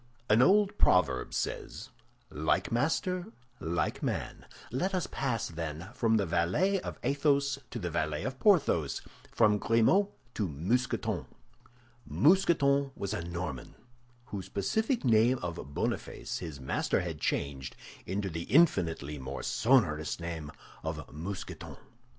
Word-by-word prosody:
An 110 +3 +6
old 205 +6 +4
proverb 70 -9 +3
says, - - -4 0.4
"Like 75 +3 0
master, 175 - 0 0.3
like 85 +1 -1
man." - - -3 0.2
Let 185 +10 0
us 180 - 0
pass, 125 -5 -2
then, 80 +1 -5
from 115 -1 +2
the 100 - +1
valet 95 - +1
of - - -6
Athos 140 -1 +2
to - - -5
the 90 -6 -3
valet 75 0 -1
of 130 +2 -4
Porthos, 145 - +3 0.3
from 105 -2 +4
Grimaud 115 - +4 0.3
to 105 - -1
Mousqueton. 100 - -1 0.8
Mousqueton 140 -5 +3
was 100 +1 -3
a 105 - -2
Norman, 85 -6 -5 0.5
whose 100 -6 -6
pacific 220 - 0
name 115 +2 +4
of 85 -1 -3 0.2
Boniface - - -3
his 80 -6 -7
master 65 - 0
had 85 -4 -5
changed 70 -2 -2 0.3
into 100 +1 -1
the 85 -2 -4
infinitely 85 - +2
more 65 +1 -6
sonorous 85 - +2
name 85 -3 -5 0.3
of - - -5
Mousqueton. 90 +6 -6
100 Hz, 125 wpm, -30 LUFS, -, 0.8 s, An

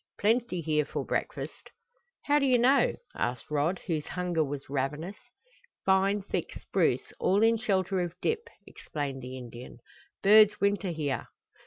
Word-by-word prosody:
"Plenty 225 -4 +1
here 150 -1 +1
for - - -4
breakfast." - - -4 0.5
"How 290 0 +3
do 275 - +2
you 255 -1 +5
know?" 260 +4 +4 0.2
asked 125 +4 -3
Rod, 150 +5 +1
whose 160 -5 -2
hunger 180 -3 0
was 145 -1 -5
ravenous. 150 +8 -3 0.7
"Fine 195 +1 +3
thick - - -3
spruce, - - 0
all 200 +3 +3
in 225 +1 +5
shelter 195 -4 0
of 175 -1 -3
dip," 460 +1 -1 0.2
explained 140 -3 -5
the 130 +1 -7
Indian. 120 -1 -9 0.5
"Birds 210 +1 +7
winter 200 -1 +1
here." 145 -7 -2
180 Hz, 145 wpm, -29 LUFS, 145-210 Hz, 0.7 s, Birds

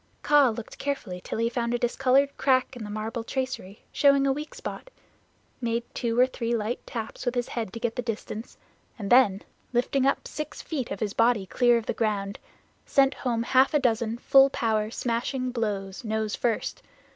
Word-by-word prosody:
Kaa 290 -3 +5
looked 225 0 -7
carefully 230 -11 -3
till - - -4
he 230 +1 +1
found 235 0 -1
a - - +2
discolored 270 +3 +2
crack 260 -1 +2
in 240 - -7
the 210 - -6
marble 220 +3 -4
tracery 245 -6 -4
showing 280 -1 +4
a 275 - +3
weak 300 +2 -7
spot, - - -7 0.7
made 235 0 0
two 235 -1 -1
or 250 - +8
three 240 -2 -2
light 225 +2 -2
taps 225 -3 -5
with 245 -1 -1
his 245 0 -1
head 225 -5 -3
to 230 - -7
get 235 -1 -2
the - - -1
distance, 225 -1 -5 0.4
and 200 -3 -5
then 215 -6 +5 0.3
lifting 255 +2 +2
up 275 - 0
six 305 0 -6
feet 275 -7 -4
of 195 - -5
his 205 -2 -1
body 230 -3 +3
clear 240 +5 +3
of 230 - -4
the - - -1
ground, 205 -3 -1 0.4
sent 275 0 +3
home 235 -3 -1
half 265 +4 +4
a - - +5
dozen 230 -3 0
full 270 +2 +6
power 220 -4 0
smashing 250 +2 -2
blows, 205 -5 -3
nose 220 -1 -1
first. 235 -3 -1
235 Hz, 190 wpm, -27 LUFS, 220-260 Hz, 0.7 s, or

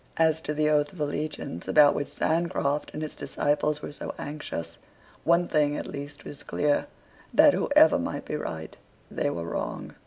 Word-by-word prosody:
As 160 -1 +3
to 150 -1 -3
the 155 0 +2
oath 150 -1 +2
of 180 - -13
allegiance 150 - -3
about 150 -2 +6
which 145 - -2
Sancroft 160 -3 0
and 155 - -3
his 155 - -5
disciples 150 +1 0
were - - -5
so 145 - -7
anxious, 145 - -6 0.5
one 170 +1 +4
thing 150 -3 +1
at - - -4
least 145 0 -8
is 145 - -8
clear, 145 -1 0 0.4
that, - - +7
whoever - - +5
might - - -4
be - - -3
right, 80 0 -5 0.4
they - - 0
were 85 -1 -4
wrong. 85 - -4
150 Hz, 175 wpm, -27 LUFS, 145-155 Hz, 0.5 s, that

